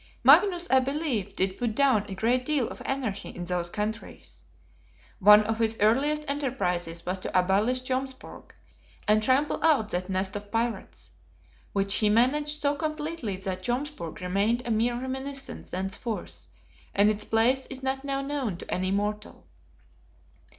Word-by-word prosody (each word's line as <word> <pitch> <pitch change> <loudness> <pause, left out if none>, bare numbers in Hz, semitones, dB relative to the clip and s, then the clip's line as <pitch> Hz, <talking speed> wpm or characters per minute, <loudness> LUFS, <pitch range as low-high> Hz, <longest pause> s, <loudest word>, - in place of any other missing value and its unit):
Magnus, 355 -4 +6
I 265 - +7
believe, 260 - -2
did 190 0 -1
put 235 -3 -1
down 260 -7 +3
a 195 - -5
great 240 +6 +1
deal 280 -3 0
of - - -9
anarchy 250 -8 -3
in 175 - -7
those 175 -1 -2
countries. 210 +3 -6 0.7
One 210 +1 +8
of 220 +1 -2
his 225 -1 +1
earliest 285 +8 +2
enterprises 180 - -2
was 185 +1 -2
to 185 - 0
abolish 210 +8 +1
Jomsburg, 260 +1 -5 0.6
and 215 +1 +4
trample 265 +6 +1
out 290 -10 +3
that 180 0 -3
nest 190 +2 -1
of 205 0 -6
pirates. 230 0 -3 0.6
Which 195 0 0
he 210 0 +2
managed 295 +7 +2
so 285 0 +3
completely 305 - -3
that 185 -1 -4
Jomsburg 245 - -4
remained 200 +7 0
a 240 - -2
mere 235 +2 +1
reminiscence 265 +2 -5
thenceforth; 195 +5 -4 0.5
and 205 +1 +5
its 210 0 -3
place 245 +4 +2
is 265 -1 -7
not 265 0 -1
now 275 -1 -2
known 275 -9 -2
to - - -7
any 185 +1 0
mortal. 210 +2 -3
230 Hz, 150 wpm, -27 LUFS, 200-270 Hz, 0.7 s, One